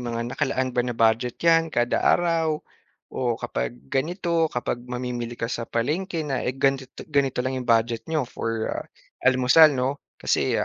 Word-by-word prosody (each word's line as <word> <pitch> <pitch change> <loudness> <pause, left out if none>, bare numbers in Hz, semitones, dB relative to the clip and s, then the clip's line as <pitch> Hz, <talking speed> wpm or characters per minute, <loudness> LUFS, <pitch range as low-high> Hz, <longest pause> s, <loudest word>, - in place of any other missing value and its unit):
mga 115 -1 -3
nakalaan 130 -1 -1
ba 125 - +1
na 120 -2 -3
budget 115 +2 +2
'yan 165 -1 +4
kada 120 0 +1
araw? 165 -3 +2 0.5
O 120 -3 -1
kapag 60 -1 -3 0.2
ganito, 165 +2 +1
kapag 120 0 -2
mamimili 125 -1 -4
ka 115 - -2
sa 115 -2 -4
palengke 160 +7 -1
na 135 -3 -2
eh 130 +1 -2
ganto 135 0 +1
to - - -8
ganito 135 -3 +2
lang 130 0 -1
'yong 125 - -8
budget 115 0 +2
niyo 155 -4 0
for 115 -2 -3 0.6
almusal 130 +5 +7
'no? 130 0 0 0.3
Kasi - - +1
ah, - - +1
130 Hz, 170 wpm, -24 LUFS, 120-155 Hz, 0.6 s, almusal